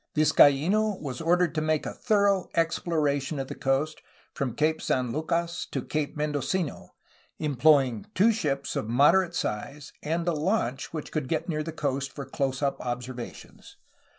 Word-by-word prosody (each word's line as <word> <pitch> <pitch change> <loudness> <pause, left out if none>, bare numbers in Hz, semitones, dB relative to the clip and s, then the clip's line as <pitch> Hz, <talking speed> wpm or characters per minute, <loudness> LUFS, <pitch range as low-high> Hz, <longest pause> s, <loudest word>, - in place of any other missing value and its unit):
Vizcaino 160 +7 +4
was 135 -3 -5
ordered 175 0 +2
to 155 - -1
make 155 -1 0
a - - -4
thorough 200 -4 +2
exploration 155 -3 0
of 135 -1 -4
the - - -4
coast 135 +4 -1 0.3
from 135 -5 -3
Cape 155 +1 +1
San 125 -2 0
Lucas 170 +4 -2
to 135 - -4
Cape 150 -1 -2
Mendocino, 150 +2 -2 0.4
employing 140 -5 +3
two 220 +5 +5
ships 145 -11 -2
of 110 - -2
moderate 170 +8 +4
size 140 +5 -4
and 165 +3 -2
a 175 - +2
launch, 155 - -1
which 155 -3 -6
could 150 -4 -2
get 160 +3 -1
near 155 -3 -1
the 165 +2 -4
coast 140 -3 -2
for 140 - -7
close 135 0 -2
up 140 - 0
observations. 125 0 -7
150 Hz, 155 wpm, -27 LUFS, 135-165 Hz, 0.4 s, two